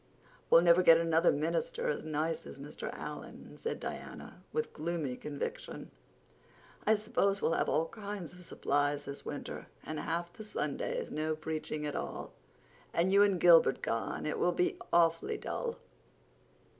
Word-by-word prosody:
"We'll 165 - +8
never 170 +1 +6
get 165 -2 +8
another 165 0 +4
minister 455 - -1
as 485 - -1
nice 155 +1 -2
as - - -9
Mr. 140 +2 -6
Allan," - - -8
said 465 - -3
Diana, - - -7
with 460 0 -2
gloomy 155 -4 -2
conviction. 150 - -5 1.0
"I 220 - +6
suppose 200 -2 +1
we'll 165 - +1
have - - +1
all 160 +1 +2
kinds 200 -4 -6
of 180 0 -13
supplies 145 -3 0
this 140 - -7
winter, - - -6 0.2
and 155 -1 -4
half 170 +3 -2
the 215 - -9
Sundays 485 - -3
no 155 +1 -1
preaching 155 -1 -4
at 145 - -3
all. - - -5 0.6
And 175 +3 +3
you 200 +1 +6
and 200 -3 +4
Gilbert 165 -6 +6
gone—it 115 +6 -2
will 175 - +3
be 180 - +1
awfully 170 - +3
dull." 475 +3 -3
170 Hz, 150 wpm, -32 LUFS, 155-200 Hz, 1.0 s, We'll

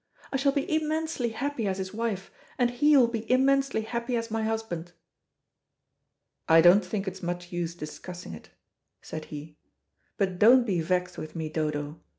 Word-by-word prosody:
"I - - +2
shall 275 +1 +3
be 280 0 -1
immensely 315 -4 -1
happy 250 -1 -2
as 190 -1 -1
his 190 0 -5
wife, 215 -4 -3 0.3
and 245 -1 +2
he 290 +4 +4
will 250 -3 +6
be 230 0 -4
immensely 270 -1 +3
happy 235 +2 -2
as 230 -1 -3
my 225 0 -1
husband." 220 -6 -3 1.6
"I 165 0 +8
don't 175 +5 +7
think 195 +2 -3
it's 190 0 -5
much 175 0 -4
use 175 -1 -3
discussing 175 - -8
it," 80 - -11 0.5
said 155 -1 -6
he. 150 +1 -9 0.6
"But 185 -3 -1
don't 245 +4 +7
be 185 -7 0
vexed 180 +2 -1
with 155 +2 -8
me, 160 -2 -3
Dodo. 150 -1 -3
200 Hz, 165 wpm, -28 LUFS, 175-245 Hz, 1.6 s, I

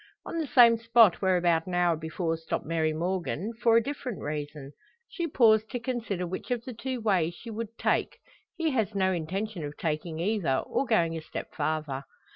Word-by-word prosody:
On 335 - -3
the 315 - -2
same 235 -3 +7
spot 230 -4 +5
where 190 -2 +3
about 170 -1 +2
an 180 - -3
hour 175 -1 +3
before 160 +1 -2
stopped 160 0 -4
Mary 160 -1 0
Morgan 180 +4 -2
for 230 -1 +5
a 230 - +3
different 260 -4 -5
reason. 145 -1 -5 0.4
She 340 -2 -3
paused 220 -6 +4
to 245 - -3
consider 230 -7 -3
which 185 +7 -6
of 245 -2 -2
the 255 - -6
two 255 +2 -4
ways 185 -7 +1
she 230 - -9
would 225 +1 -6
take; - - 0 0.4
he 325 -3 0
has 220 -6 0
no 190 -1 +2
intention 185 +2 -3
of 145 0 -6
taking 155 0 -3
either, 180 -7 +1
or 275 - -1
going 170 -8 +2
a 160 - -4
step 155 - -7
farther. 155 -4 -2
190 Hz, 195 wpm, -28 LUFS, 165-230 Hz, 0.4 s, same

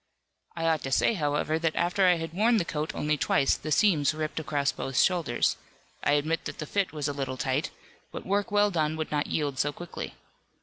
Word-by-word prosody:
"I 165 -1 -2
ought 160 -2 +2
to 135 - -5
say 180 - +3
however 155 -2 0
that 165 -1 0
after 185 +2 +2
I 180 - +6
had 165 -1 -5
worn 225 +5 +3
the 180 - 0
coat 155 -1 -3
only 150 0 0
twice 135 - +2
the 155 - -6
seams 155 -5 +3
ripped 155 0 -3
across 145 -2 0
both 135 -1 -5
shoulders, 170 -10 +2 0.5
I - - +3
admit 155 +3 0
that - - -5
the 155 - -5
fit 200 +5 -1
was 150 -2 -3
a 145 - -2
little 135 -2 -4
tight, 130 +3 -1 0.4
but - - -7
work 200 +3 0
well 205 0 +3
done 155 -3 0
would 155 -1 -4
not 145 -1 0
yield 145 -4 -2
so 145 - +1
quickly. 175 +3 -7
155 Hz, 215 wpm, -28 LUFS, 145-175 Hz, 0.5 s, I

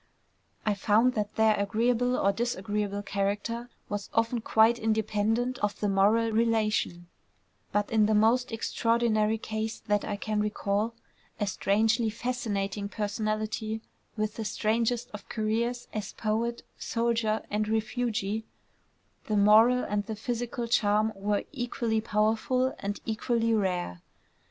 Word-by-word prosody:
I 215 - +3
found 215 +5 +3
that 210 -2 -3
their 220 -1 +4
agreeable 240 +5 +1
or 200 - +3
disagreeable 205 -2 -2
character 205 +5 -2 0.2
was 205 -1 -4
often 230 +1 +1
quite 225 +2 +4
independent 220 +3 0
of 210 0 -1
the 210 - 0
moral 210 +4 +3
relation: 215 -6 +1 0.7
but 205 0 0
in 215 -2 +4
the 215 - +2
most 235 +4 +3
extraordinary 225 -1 +1
case 220 0 -4
that 205 -2 0
I 205 - -2
can 210 +1 -2
recall 210 +1 -1 0.4
(a 205 - +1
strangely 220 +3 +2
fascinating 210 -4 -2
personality 215 +1 -2 0.3
with 215 0 -2
the 225 - -2
strangest 230 +3 0
of 210 - -10
careers 230 +3 -1
as 210 -2 -4
poet, 230 +2 -1 0.2
soldier, 230 -2 0
and 210 +1 0
refugee) 220 -1 -1 0.8
the 215 - +1
moral 220 +5 +6
and 205 0 -1
the 220 - -3
physical 240 +2 -3
charm 215 -2 +2
were 205 +1 -1
equally 235 -4 -1
powerful 225 +5 +1
and 205 +1 -3
equally 230 +1 0
rare. 180 - -1
220 Hz, 125 wpm, -28 LUFS, 210-230 Hz, 0.8 s, moral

